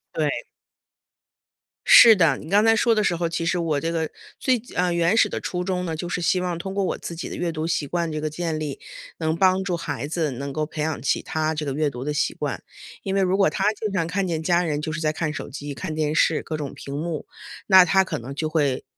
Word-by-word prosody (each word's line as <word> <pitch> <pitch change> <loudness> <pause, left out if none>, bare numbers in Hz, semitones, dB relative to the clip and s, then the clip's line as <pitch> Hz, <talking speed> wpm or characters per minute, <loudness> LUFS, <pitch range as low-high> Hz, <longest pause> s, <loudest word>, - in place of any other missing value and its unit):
对。 - - -1 1.4
是 235 - +9
的， 165 -8 +3
你 155 - -10
刚 205 +2 +4
才 225 0 +5
说 230 +1 +3
的 215 - +1
时 175 - +1
候， 170 0 -1
其 165 0 -2
实 170 - +1
我 160 -4 0
这 165 +3 -2
个 160 -1 -1 0.3
最， 250 -4 +1
啊， 180 0 +1
原 170 +3 +2
始 - - +4
的 - - -3
初 180 0 -3
衷 180 -1 -2
呢， 165 -2 -3
就 175 +2 -5
是 180 - -2
希 180 +2 +2
望 180 -2 -2
通 190 +3 -5
过 200 - 0
我 185 - -1
自 170 - -7
己 165 - -6
的 - - -6
阅 175 -1 -2
读 155 -1 -3
习 160 -3 -1
惯 170 -1 -1
这 155 - -3
个 155 0 -2
建 160 0 -3
立， 150 -3 -4 0.4
能 160 -1 0
帮 185 +2 +3
助 180 -3 -1
孩 140 -5 -4
子 155 -2 -1
能 140 +3 -5
够 155 +3 -1
培 155 0 -6
养 155 0 -2
起 - - 0
他 155 0 -1
这 150 - -3
个 140 - -2
阅 150 +1 +1
读 125 -2 -7
的 150 +2 -2
习 145 - 0
惯， - - -4 0.4
因 195 0 -2
为 195 - +3
如 190 +1 +2
果 195 - +4
他 200 +1 +1
经 215 0 -4
常 165 -4 +1
看 185 +2 -1
见 160 -2 -2
家 175 +1 +2
人 150 -3 -1
就 155 - -3
是 160 - -3
在 155 -1 +1
看 155 -1 -2
手 - - -6
机、 145 +1 -6
看 155 - -5
电 155 -1 0
视、 155 0 +2
各 155 - -4
种 145 -3 -5
屏 140 - -8
幕， 160 0 -4 0.4
那 190 -2 +8
他 190 +2 +4
可 185 - -4
能 130 +4 -8
就 155 +1 -2
会， 145 -5 0
165 Hz, 280 characters per minute, -23 LUFS, 155-180 Hz, 1.4 s, 是